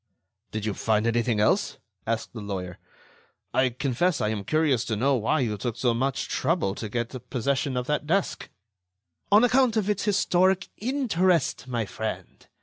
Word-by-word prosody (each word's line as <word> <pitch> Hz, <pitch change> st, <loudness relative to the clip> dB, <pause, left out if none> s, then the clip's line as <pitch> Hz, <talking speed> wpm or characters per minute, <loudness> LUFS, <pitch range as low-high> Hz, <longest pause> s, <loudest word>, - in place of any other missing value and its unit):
"Did 110 Hz, -1 st, -3 dB
you 105 Hz, -, -1 dB
find 110 Hz, +1 st, +1 dB
anything 115 Hz, -1 st, +1 dB
else?" 105 Hz, -, +2 dB, 0.3 s
asked 115 Hz, 0 st, -2 dB
the 115 Hz, -, -7 dB
lawyer. 95 Hz, -3 st, -5 dB, 0.7 s
"I 130 Hz, 0 st, +3 dB
confess 140 Hz, +7 st, 0 dB
I 105 Hz, -, 0 dB
am 105 Hz, -2 st, -3 dB
curious 145 Hz, 0 st, +2 dB
to 110 Hz, -, -1 dB
know 135 Hz, +6 st, +2 dB
why 125 Hz, +6 st, +1 dB
you 105 Hz, -4 st, -1 dB
took 120 Hz, +1 st, -3 dB
so 120 Hz, -2 st, +2 dB
much 130 Hz, +3 st, -1 dB
trouble 155 Hz, -, 0 dB
to 110 Hz, +1 st, -6 dB
get 120 Hz, +2 st, -4 dB
possession 135 Hz, +1 st, -1 dB
of 125 Hz, -, -1 dB
that 150 Hz, +1 st, -1 dB
desk." 190 Hz, +4 st, 0 dB, 0.8 s
"On 210 Hz, +3 st, +7 dB
account 245 Hz, -2 st, +3 dB
of 210 Hz, -1 st, +1 dB
its 205 Hz, 0 st, -2 dB
historic 190 Hz, -2 st, +2 dB
interest, 190 Hz, -, +1 dB
my 120 Hz, -3 st, -1 dB
friend. 110 Hz, +2 st, -6 dB
130 Hz, 165 wpm, -26 LUFS, 110-175 Hz, 0.8 s, On